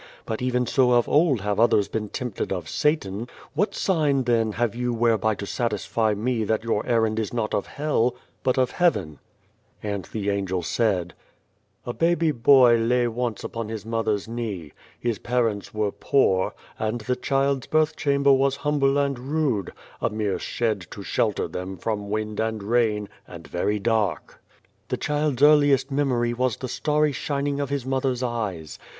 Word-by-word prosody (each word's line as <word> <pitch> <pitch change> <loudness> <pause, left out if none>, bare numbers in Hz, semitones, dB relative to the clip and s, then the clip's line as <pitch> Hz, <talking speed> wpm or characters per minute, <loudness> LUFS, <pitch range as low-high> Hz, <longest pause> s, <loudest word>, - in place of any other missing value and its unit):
But 110 +1 -4
even 125 0 +1
so 125 0 +3
of 120 -1 +3
old 145 - +3
have 105 +1 -1
others 110 -3 +4
been 105 -2 -3
tempted 125 -2 -4
of 90 -4 -3
Satan. 120 -8 0 0.3
What 200 +9 0
sign 150 -7 +1
then 115 -3 +1
have 120 -1 0
you 125 0 -1
whereby 110 -2 +2
to 100 - -6
satisfy 110 0 -1
me 115 +2 -1
that 110 +1 0
your 115 -2 0
errand 110 -2 +2
is 110 - -2
not 115 -3 -2
of - - -1
Hell, 135 -5 0 0.3
but 130 0 +1
of 130 -1 +2
Heaven? 95 - +1 0.3
" - - -37
And 100 -2 -3
the 100 -2 -2
Angel 95 -3 -1
said: 95 -4 0 0.4
" - - -43
A 120 - -3
baby 165 0 +2
boy 125 -2 +6
lay 120 +2 +2
once 120 -2 -3
upon 115 -2 -5
his 110 -2 -6
mother's 110 -2 -1
knee. 110 -10 -5 0.3
His 120 -3 -2
parents 115 -4 -1
were 105 -1 -1
poor, 95 -9 +1 0.2
and 110 +2 -2
the 125 +3 -1
child's 135 0 0
birth 155 0 +2
chamber 140 -1 +3
was 135 0 +2
humble 140 -2 +2
and 140 -3 0
rude 130 - -1 0.3
a - - +1
mere 105 -2 -2
shed 110 -7 -2
to - - -8
shelter - - 0
them 95 +1 -6
from 105 +2 -3
wind 105 0 -2
and 110 -2 -1
rain 105 -2 +1 0.2
and 85 -2 -10
very 105 +4 -1
dark. 110 -1 -1 0.2
" - - -41
The - - -1
child's 145 -3 0
earliest 145 -2 +5
memory 125 -4 +1
was 125 -1 0
the 130 - -5
starry 150 +3 +1
shining 140 0 -2
of 140 -2 -2
his 140 -3 -2
mother's 130 -1 -1
eyes. 105 -10 -3
120 Hz, 175 wpm, -24 LUFS, 105-135 Hz, 0.4 s, boy